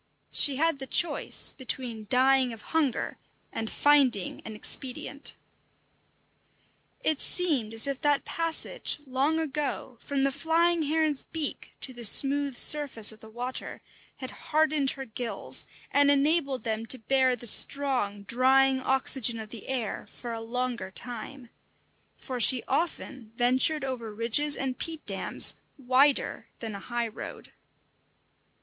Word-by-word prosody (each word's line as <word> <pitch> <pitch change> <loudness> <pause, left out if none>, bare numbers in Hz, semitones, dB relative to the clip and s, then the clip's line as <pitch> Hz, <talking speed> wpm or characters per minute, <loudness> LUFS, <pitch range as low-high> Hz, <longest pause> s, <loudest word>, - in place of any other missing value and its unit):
She 280 - +4
had 320 0 0
the 265 - -7
choice 345 - +3
between 240 -4 -5
dying 260 0 +3
of 220 - -11
hunger 295 -6 -1 0.3
and 225 -1 -4
finding 270 -10 +2
an 220 - -8
expedient. 265 +5 -2 1.7
It 310 -2 +1
seemed 295 -12 +3
as 225 - +6
if 275 -1 -3
that 290 -1 +1
passage, 330 -1 +1
long 275 +5 -1
ago, 290 -5 -4
from 280 -2 -2
the 275 - +1
flying 330 +4 +1
heron's 310 -1 -1
beak 315 -3 -4
to 260 - -4
the 240 -1 -9
smooth 275 +3 +3
surface 280 -8 +4
of 220 - -12
the 220 - -14
water 245 +3 -5 0.4
had 260 - -6
hardened 305 -2 0
her 270 - -6
gills 225 -3 +1 0.2
and 285 0 +4
enabled 280 -3 +1
them 225 0 -4
to 260 - +3
bear 260 +2 +1
the 240 - -11
strong, 240 -4 +2
drying 260 +4 +2
oxygen 260 -3 +2
of 215 -1 -9
the 225 -2 -10
air 250 -6 -4
for 240 -2 -8
a 225 - -5
longer 240 -2 -4
time; 245 +4 -5 0.7
for 255 -2 -6
she 245 +2 +7
often 265 -6 -4
ventured 255 +5 +2
over 240 -4 -5
ridges 230 +7 +3
and 260 -2 -4
peat 320 -2 -4
dams - - 0 0.2
wider 270 +2 +1
than 225 -2 -7
a 200 - -7
high 240 +3 -4
road. 225 - -10
260 Hz, 140 wpm, -27 LUFS, 235-285 Hz, 1.7 s, she